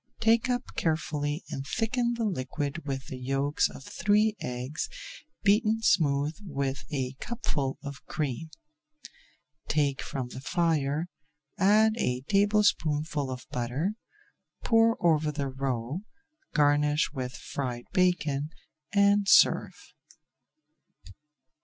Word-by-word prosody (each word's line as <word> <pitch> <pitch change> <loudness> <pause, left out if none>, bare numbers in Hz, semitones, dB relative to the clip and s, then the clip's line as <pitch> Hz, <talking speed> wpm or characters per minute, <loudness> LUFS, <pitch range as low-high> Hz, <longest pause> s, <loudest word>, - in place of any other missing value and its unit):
Take 230 +2 +3
up 245 0 +1
carefully 155 -1 -1
and 135 - -3
thicken 235 - 0
the 230 - -2
liquid 145 -3 -3
with 135 -1 -3
the 130 - -7
yolks 135 +3 +1
of - - -11
three 210 +6 +2
eggs 125 +5 -4 0.5
beaten 215 +2 +3
smooth 145 -5 +2
with 140 -7 -3
a 130 -3 -2
cupful 145 - -2
of 140 -1 -7
cream. 150 +1 -3 1.2
Take 140 -3 +1
from 130 -3 -4
the 130 - -8
fire, 155 0 0 0.5
add 215 +3 +5
a 125 - 0
tablespoonful 160 -6 +2
of 130 0 -6
butter, 125 - -1 0.7
pour 225 0 +4
over 155 -2 +3
the 140 -2 -3
roe, 130 +2 -2 0.5
garnish 150 0 +3
with 130 -2 -4
fried 125 -3 -4
bacon, 155 -6 +1 0.4
and 200 0 +4
serve. - - +4
150 Hz, 110 wpm, -28 LUFS, 135-200 Hz, 1.2 s, add